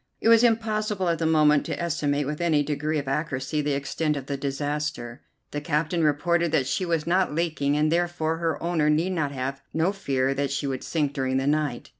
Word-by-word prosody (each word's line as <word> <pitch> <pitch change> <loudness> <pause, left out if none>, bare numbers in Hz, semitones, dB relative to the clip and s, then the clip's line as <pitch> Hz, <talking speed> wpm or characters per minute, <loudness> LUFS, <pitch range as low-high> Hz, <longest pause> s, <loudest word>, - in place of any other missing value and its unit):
It 225 - +2
was 230 0 +7
impossible 215 -4 +1
at 165 -2 0
the 165 - +1
moment 150 -2 +4
to - - -3
estimate 145 -4 0
with 150 +3 -4
any 160 -4 +2
degree 150 +2 -2
of 140 -2 -3
accuracy 145 +1 -1
the 145 0 -1
extent 145 +2 -1
of 135 - -6
the 140 - -3
disaster. 140 -3 -3 0.3
The 145 - -3
captain 160 +2 0
reported 170 +3 +2
that 140 -5 +2
she 180 +7 -1
was 165 -3 0
not 180 -3 +1
leaking, 155 -4 0
and 155 +1 +2
therefore 170 -2 0
her 165 -3 -2
owner 165 -3 +1
need 165 +5 +1
have 140 -3 -2
no 165 +4 +2
fear 135 -9 0
that 140 0 -1
she 140 +1 -2
would 135 -2 -3
sink 150 -4 -1
during 130 -1 -1
the 135 - 0
night. 145 -4 -1
150 Hz, 205 wpm, -25 LUFS, 140-170 Hz, 0.3 s, was